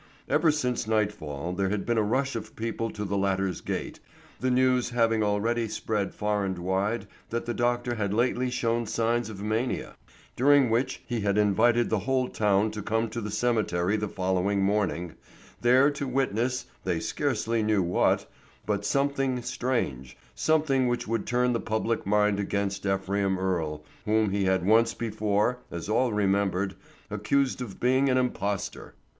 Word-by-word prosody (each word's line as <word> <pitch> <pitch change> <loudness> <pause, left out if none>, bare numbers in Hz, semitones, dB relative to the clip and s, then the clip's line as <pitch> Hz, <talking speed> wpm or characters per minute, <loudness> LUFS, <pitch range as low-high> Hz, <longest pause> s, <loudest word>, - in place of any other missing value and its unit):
Ever 155 +3 +3
since 125 -6 0
nightfall 90 -8 -1
there 95 +1 0
had 105 0 -2
been 120 -1 +1
a - - +4
rush 130 +6 0
of 110 -1 -6
people 115 0 -3
to 105 -1 -5
the 100 0 -1
latter's 95 -2 0
gate, - - -4 0.4
the 130 - 0
news 125 -1 +3
having 115 -2 +2
already 110 +3 +1
spread 105 -1 -2
far 105 -1 0
and 95 -2 -2
wide 95 +6 -1 0.2
that 115 +1 -3
the 120 - -2
doctor 120 0 0
had 105 -4 -2
lately 125 +3 +1
shown 120 -2 0
signs 115 0 0
of 100 -2 -7
mania, 110 +4 -2 0.4
during 140 -1 +4
which 130 +3 0
he 120 -2 -2
had 100 0 +1
invited 115 +4 +3
the 110 - +2
whole 130 +5 0
town 105 0 +2
to 105 0 -5
come 115 +2 0
to 115 - -4
the 105 - -4
cemetery 105 -4 +1
the 105 0 -1
following 95 +1 0
morning, 95 -4 0 0.5
there 130 +4 +5
to 140 -1 -4
witness, 125 -1 0 0.2
they 90 -3 0
scarcely 115 - -1
knew 105 -3 +2
what, 90 +1 +2 0.4
but 100 -1 -1
something 135 0 0
strange, 65 - -2 0.2
something 150 -5 +2
which 120 0 -1
would 115 -1 -2
turn 125 0 +2
the 115 - 0
public 110 -1 -1
mind 105 0 +3
against 100 0 -2
Ephraim 95 0 0
Earle, 80 -5 -2 0.2
whom 110 -1 +2
he 100 0 0
had 95 -1 +1
once 115 +2 +4
before, 110 +1 0
as 85 +2 -6
all 120 +3 +2
remembered, 100 -2 +1 0.4
accused 130 +6 0
of 110 -6 -7
being 130 +2 +3
an 130 - +3
impostor. 105 -6 -2
110 Hz, 165 wpm, -27 LUFS, 100-120 Hz, 0.5 s, there